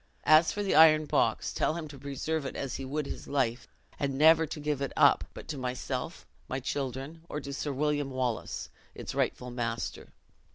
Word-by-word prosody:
As 155 +1 +6
for 205 - -2
the 195 - 0
iron 155 0 +7
box, - - +1
tell 155 - +1
him 165 -2 -5
to 140 -2 -11
preserve 140 +3 -3
it 135 - -5
as 135 -2 -3
he 135 - -5
would 145 +2 -2
his - - -7
life; 130 -4 0 0.3
and 140 -1 -1
never 160 +2 +6
to 155 - -6
give 150 -2 -2
it 140 - -2
up, - - +5
but - - -9
to 150 -3 -4
myself, 125 0 -4 0.2
my 130 - -2
children, 135 +4 -4
or 150 - -3
to 140 -2 -7
Sir 145 +1 -3
William 145 0 0
Wallace, 130 -3 -3 0.3
it's - - -6
rightful 125 0 -1
master.'" 115 -2 -3
140 Hz, 195 wpm, -30 LUFS, 130-155 Hz, 0.3 s, iron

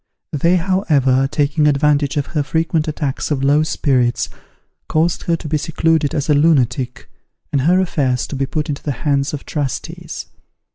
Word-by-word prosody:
They, 165 +5 +3
however, 150 -8 +2
taking 150 +1 +2
advantage 145 0 +2
of 145 - 0
her 150 - +1
frequent 160 +1 0
attacks 145 -3 -2
of 140 -3 -1
low 145 +2 +4
spirits, 130 -6 +1 0.6
caused 165 +2 +1
her 170 - +2
to 160 - -7
be 155 0 0
secluded 160 -1 +1
as 145 -2 -1
a 150 - +4
lunatic, 135 -4 +1 0.4
and 140 - +1
her 175 +7 +3
affairs 135 -9 0
to - - -6
be 135 0 -1
put 150 +4 -2
into 145 -2 -4
the 145 - -2
hands 140 -1 +1
of 145 - -6
trustees. 145 -5 -4
150 Hz, 165 wpm, -18 LUFS, 140-160 Hz, 0.6 s, low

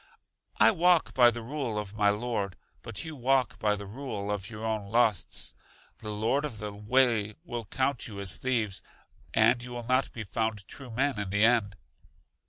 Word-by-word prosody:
I - - +7
walk 175 -3 +3
by 120 -2 +7
the 120 -1 -5
rule 130 -3 -3
of 105 -1 -4
my 105 -1 +3
Lord, 105 -3 -2 0.2
but 105 -3 -5
you 160 -1 -6
walk 130 0 +1
by 105 -1 +2
the 100 0 -7
rule 105 -2 -5
of 100 -2 -3
your 110 -1 -6
own 110 -2 -2
lusts. 110 -4 +2 0.5
The 110 - -6
Lord 110 +7 0
of 145 -7 -4
the 105 0 -5
way 110 0 +2
will 120 -9 -5
count 130 +4 -1
you 105 -3 -8
as 95 -2 0
thieves, 110 -7 -1 0.5
and 115 +2 +5
you 125 - -8
will 120 -1 -5
not 130 +2 +1
be 115 - -6
found 110 -1 -2
true 135 -3 -6
men 130 +1 0
in 100 -2 -3
the 105 +2 +4
end. 115 -4 +3
110 Hz, 190 wpm, -29 LUFS, 105-125 Hz, 0.5 s, I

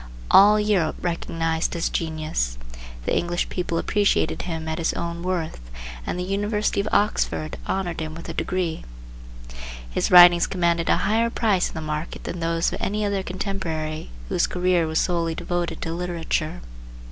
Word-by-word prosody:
All 210 +2 +8
Europe 205 -7 +1
recognized 165 -1 -1
his 165 - 0
genius, 155 - -2 0.5
the - - +1
English 175 0 -1
people 175 -2 -2
appreciated 205 +4 +1
him 160 -2 -4
at 160 +1 -2
his 165 - 0
own 170 0 -4
worth, 175 - -2 0.5
and - - -2
the 180 - -2
University 205 +2 0
of 200 - 0
Oxford 200 -6 +1
honored 185 -3 -2
him 155 -1 -4
with 165 - -9
a 165 - -5
degree. 175 -2 -2 1.0
His - - -1
writings 175 -1 +8
commanded 170 -2 0
a - - +4
higher 225 +3 +2
price 210 -6 +1
in - - -12
the 160 - -4
market 155 +1 -4
than 175 - -5
those 165 0 0
of - - -5
any 210 +2 -1
other 200 -1 0
contemporary 175 -5 -4 0.2
whose - - +1
career 180 -2 +1
was 160 0 0
solely 170 -2 0
devoted 175 0 -3
to 165 - -3
literature. 170 - -2
175 Hz, 160 wpm, -24 LUFS, 165-190 Hz, 1.0 s, All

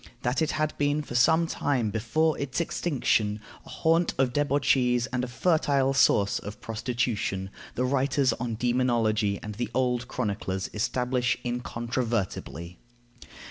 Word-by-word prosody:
That 125 +6 0
it 160 - +1
had 155 0 -1
been 145 +1 +1
for 120 - -8
some 160 +7 +4
time 130 -8 -1
before 150 +9 +1
its 140 0 -2
extinction 120 -11 0 0.3
a - - -12
haunt 165 +1 +1
of 130 -2 +1
debauchees 135 -4 +2
and 125 -1 0
a - - -2
fertile 140 -1 +2
source 100 -6 +3
of 105 +1 -8
prostitution, 110 -4 -2 0.2
the 125 - 0
writers 135 -1 +2
on 115 -1 -3
demonology 115 -4 +1
and 105 - -5
the 115 +1 -3
old 125 -1 0
chroniclers 100 -6 -3
establish 125 +3 0
incontrovertibly. 115 - -3
125 Hz, 135 wpm, -27 LUFS, 110-140 Hz, 0.3 s, some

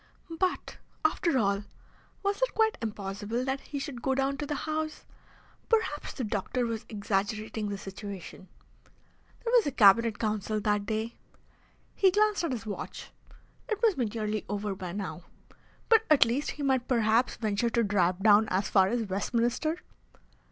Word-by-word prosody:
But, 370 -1 -1 0.3
after 315 -1 +2
all, 200 -3 +1 0.6
was 400 +3 0
it - - +1
quite 445 0 +3
impossible 210 +2 -3
that 270 0 -1
he 290 - -6
should 275 -4 -5
go 265 +1 +1
down 270 +1 +1
to 290 - -4
the 295 - -2
House? 310 0 -3 0.6
Perhaps 440 -10 0
the 260 - -4
doctor 215 +3 -1
was 225 -2 -4
exaggerating 210 +1 -2
the 200 - -3
situation. 195 -2 -8 1.0
There 470 - -1
was 465 -8 +5
a - - 0
Cabinet 225 0 +5
Council 215 -1 -1
that 205 -1 0
day. 220 +1 -2 0.8
He 385 - +4
glanced 420 0 +2
at 335 - -1
his 230 -3 -4
watch. 210 - -6 0.6
It 435 -2 -1
must 440 -5 +5
be 250 - 0
nearly 215 -1 -2
over 205 0 -2
by 185 -2 -6
now. 190 -2 -5 0.7
But 450 -1 +5
at 300 -5 +7
least 250 +6 -1
he 290 - -4
might 260 -3 +1
perhaps 230 0 +2
venture 215 +1 0
to 235 0 +1
drive 190 -2 +1
down 215 0 +6
as 190 +1 0
far 190 -1 +5
as 230 +3 0
Westminster. 235 - 0
225 Hz, 160 wpm, -29 LUFS, 205-280 Hz, 1.0 s, at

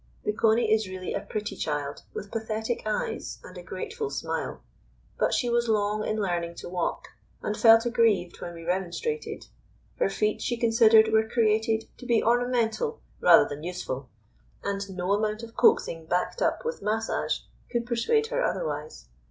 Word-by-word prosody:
The 210 - 0
Coney 220 +1 +3
is 215 -3 +1
really 185 -1 -5
a - - -2
pretty 210 -1 -4
child 145 -2 -3
with 200 - -7
pathetic 220 +1 -2
eyes 215 - -2
and - - -12
a - - -7
grateful 450 -1 -5
smile; - - -4 0.6
but - - +2
she 245 - +1
was 235 0 +1
long 210 0 +1
in 215 - -1
learning 175 -4 -1
to - - -8
walk, 175 -1 -2 0.3
and 210 - -1
felt 225 +1 +6
aggrieved 220 -7 +2
when 175 - -6
we 165 - -9
remonstrated. 190 - -3 0.5
Her - - +3
feet, 210 +2 0
she 240 - -1
considered, 225 -1 +5
were 220 0 +3
created 220 -1 +2
to 250 - -9
be 230 -2 +3
ornamental 245 - +1 0.2
rather - - +7
than 145 +1 -6
useful, 145 -7 -5 0.5
and 200 0 -2
no 185 0 -3
amount 215 +2 -1
of 230 0 -10
coaxing 435 - +3
backed 180 - -1
up - - +1
with 475 +1 -3
massage 220 +1 -1 0.3
could 235 -1 -1
persuade 345 - +1
her - - +1
otherwise. 485 -1 -3
220 Hz, 165 wpm, -27 LUFS, 190-235 Hz, 0.6 s, rather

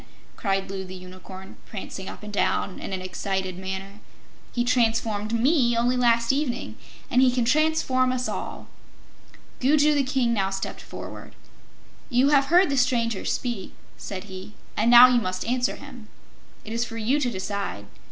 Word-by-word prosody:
cried 195 -2 -1
Loo 195 -1 -4
the 185 0 -9
Unicorn, 185 +1 -11
prancing 195 -2 -7
up - - -10
and 210 0 -8
down 200 -1 0
in - - -6
an 185 -1 -3
excited 185 0 -3
manner. 190 +2 -6 0.5
"He 240 - 0
transformed 225 -3 +1
ME, 240 0 +3
only 245 +2 +2
last 235 0 +3
evening, 275 -3 -2 0.4
and 250 - +4
he 260 - +6
can 245 -1 0
transform 265 -2 +2
us 255 0 -1
all." - - -5 0.9
Gugu 295 +3 +4
the 290 - +2
King 255 -3 +1
now 195 -3 +1
stepped 195 0 -5
forward. - - -9 0.7
"You 250 +3 +3
have 280 -2 +4
heard 345 +2 +4
the 275 - 0
stranger 230 -4 +1
speak," 235 -7 -3 0.2
said 185 -2 -6
he, 190 +1 -9 0.2
"and 225 +3 +2
now 240 +1 +10
you 245 -1 +3
must 185 -2 -3
answer 245 +1 0
him. 255 -6 -12 0.6
It 220 - -6
is 230 +1 0
for 230 -1 -6
you 240 +6 +1
to 260 -4 0
decide. 195 - -4
230 Hz, 165 wpm, -25 LUFS, 195-255 Hz, 0.9 s, now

